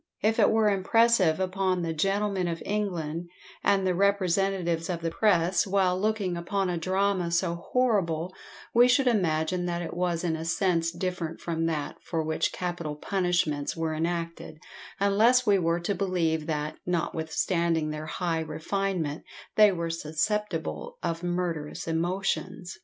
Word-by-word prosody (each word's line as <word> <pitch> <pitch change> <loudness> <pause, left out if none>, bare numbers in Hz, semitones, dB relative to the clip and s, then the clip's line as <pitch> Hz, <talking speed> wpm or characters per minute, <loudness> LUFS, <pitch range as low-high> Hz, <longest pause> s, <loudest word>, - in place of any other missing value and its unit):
If 220 +2 +2
it 205 - +6
were 220 -1 +3
impressive 200 -3 +3
upon 185 -1 0
the 165 -1 -1
"gentlemen 195 +2 0
of 165 -1 -4
England," 175 -5 -2 0.3
and 195 -1 +3
the 185 - +2
representatives 190 -3 +1
of 170 -2 -2
the 165 0 -2
press, 180 -2 +2
while 190 -2 +2
looking 210 -4 0
upon 185 +2 -1
a 175 - -1
drama 185 0 +1
so 170 0 +1
horrible, 180 -4 0 0.4
we 240 +1 +7
should 250 +2 +3
imagine 180 -5 +1
that 175 0 -2
it 165 - -5
was 175 -1 -1
in 165 -2 0
a 160 - -5
sense 165 -1 +1
different 175 -2 -4
from 165 -1 -1
that 155 -3 -3
for 165 -2 -2
which 160 0 0
capital 175 -4 -4
punishments 175 -4 0
were 165 -1 -1
enacted; 165 0 -3 0.4
unless 220 +6 +4
we 200 -3 +4
were 170 0 +1
to 185 +4 -1
believe 175 -5 0
that, 150 -1 -2
notwithstanding 165 -1 0
their 155 0 -5
high 165 0 -1
refinement, 160 0 -2 0.3
they 210 -1 +7
were 170 -2 -2
susceptible 165 +2 -2
of 170 -1 -2
murderous 175 -4 -3
emotions. 180 +2 -2
175 Hz, 145 wpm, -27 LUFS, 165-195 Hz, 0.4 s, we